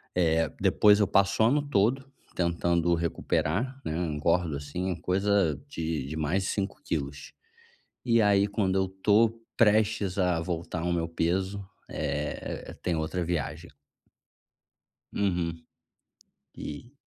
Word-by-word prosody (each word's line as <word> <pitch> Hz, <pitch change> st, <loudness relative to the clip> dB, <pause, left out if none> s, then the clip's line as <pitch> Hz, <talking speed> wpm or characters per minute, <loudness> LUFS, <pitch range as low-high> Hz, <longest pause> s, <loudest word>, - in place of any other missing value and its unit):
eh, 80 Hz, -2 st, +2 dB
depois 105 Hz, 0 st, +5 dB
eu 105 Hz, -, +3 dB
passo 100 Hz, +3 st, +3 dB
o -, -, +6 dB
ano 145 Hz, +5 st, +3 dB
todo 135 Hz, 0 st, +1 dB, 0.2 s
tentando 85 Hz, 0 st, +1 dB
recuperar, 95 Hz, -, -1 dB
né. 80 Hz, -, -2 dB
Engordo 85 Hz, 0 st, 0 dB
assim, 85 Hz, +6 st, -3 dB
coisa 95 Hz, -2 st, +1 dB
de 80 Hz, -, -3 dB
de 75 Hz, -, -5 dB
mais 80 Hz, +6 st, 0 dB
de -, -, -2 dB
5 100 Hz, -1 st, -3 dB
quilos. 70 Hz, -1 st, -4 dB, 0.7 s
E 115 Hz, -1 st, +4 dB
aí 100 Hz, -1 st, +4 dB
quando 100 Hz, -2 st, 0 dB
eu 95 Hz, -1 st, +1 dB
tô 110 Hz, +4 st, +2 dB, 0.2 s
prestes 105 Hz, -3 st, +2 dB
a 90 Hz, -3 st, +2 dB
voltar 85 Hz, 0 st, -3 dB
ao 85 Hz, +1 st, 0 dB
meu 85 Hz, -1 st, -1 dB
peso, 95 Hz, +4 st, -1 dB, 0.2 s
eh 75 Hz, +1 st, -3 dB
eh, -, -, -8 dB
tem 90 Hz, -, 0 dB
outra 80 Hz, +3 st, -2 dB
viagem. 80 Hz, 0 st, -3 dB, 1.5 s
Uhum. 85 Hz, -4 st, -1 dB, 0.9 s
E 75 Hz, -, -8 dB
90 Hz, 130 wpm, -28 LUFS, 80-100 Hz, 1.5 s, o